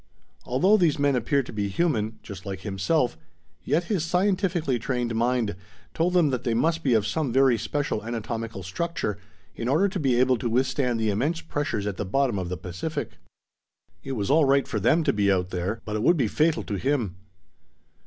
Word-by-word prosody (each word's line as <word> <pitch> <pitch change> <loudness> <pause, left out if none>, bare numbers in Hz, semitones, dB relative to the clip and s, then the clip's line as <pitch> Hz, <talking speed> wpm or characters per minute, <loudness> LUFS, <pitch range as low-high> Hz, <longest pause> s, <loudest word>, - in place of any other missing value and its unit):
Although 185 +12 +4
these 170 -7 +2
men 140 -1 +2
appeared 130 +3 +1
to - - -9
be 105 -2 -1
human, 110 - 0
just 100 -3 -9
like 95 -2 -6
himself, 105 - 0 0.5
yet 165 +4 +1
his 185 -3 -1
scientifically 180 - +1
trained 120 -1 -2
mind 115 -3 0 0.4
told 180 +2 +1
him 155 -5 +4
that 125 -1 -2
they 115 -2 0
must 165 +7 +1
be 130 -6 +2
of 105 -2 +2
some 135 +5 -1
very 130 0 +4
special 115 0 -2
anatomical 115 -3 -4
structure, 105 - -3 0.4
in 115 - -4
order 155 +10 +3
to 190 -1 -3
be 130 -5 +2
able 130 -1 +3
to 120 - -1
withstand 125 0 +1
the 110 -1 +1
immense 145 +11 -1
pressures 145 -10 -2
at 100 -3 -3
the - - -2
bottom 120 +1 0
of 90 -2 -4
the 90 - -3
Pacific. 90 - -5 0.8
It 135 - -4
was 105 -3 -1
all 155 0 +5
right 140 0 +3
for 110 - -2
them 155 - +3
to - - +2
be 100 -1 +2
out 90 -1 0
there, 95 +6 -3
but 105 - -3
it 105 - -1
would 170 +9 +4
be 125 -6 +2
fatal 155 +8 +1
to 100 - -3
him! 125 -10 -1
125 Hz, 200 wpm, -25 LUFS, 105-155 Hz, 0.8 s, all